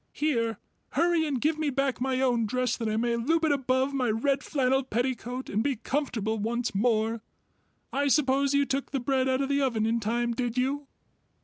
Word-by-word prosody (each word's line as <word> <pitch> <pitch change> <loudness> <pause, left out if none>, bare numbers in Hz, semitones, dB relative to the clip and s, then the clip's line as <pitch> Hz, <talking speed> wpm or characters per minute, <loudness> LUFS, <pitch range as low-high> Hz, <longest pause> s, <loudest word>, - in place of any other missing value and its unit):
"Here, 230 -8 0 0.4
hurry 335 +1 +2
and 275 -4 -1
give 310 +4 0
me 310 -2 +1
back 275 -2 -1
my 260 0 0
own 240 -4 +2
dress 255 +3 0
that 230 -2 -3
I 215 - 0
may 235 +1 +1
loop 320 +8 +1
it 310 - +2
above 265 0 +1
my 255 -4 0
red 270 +6 +1
flannel 265 -2 +1
petticoat 250 +1 -3
and 210 - 0
be 280 -1 0
comfortable 225 -3 -2
once 235 +3 -1
more. 225 +1 +1 0.7
I 285 +1 +1
suppose 275 -1 +2
you 280 0 +3
took 270 0 -2
the 270 - -1
bread 260 +1 +1
out 260 +1 +1
of 275 - -1
the 280 0 +2
oven 235 -5 +1
in 230 +1 +1
time 235 +2 -1
did 240 0 -2
you?" 275 +3 -1
255 Hz, 200 wpm, -28 LUFS, 235-280 Hz, 0.7 s, you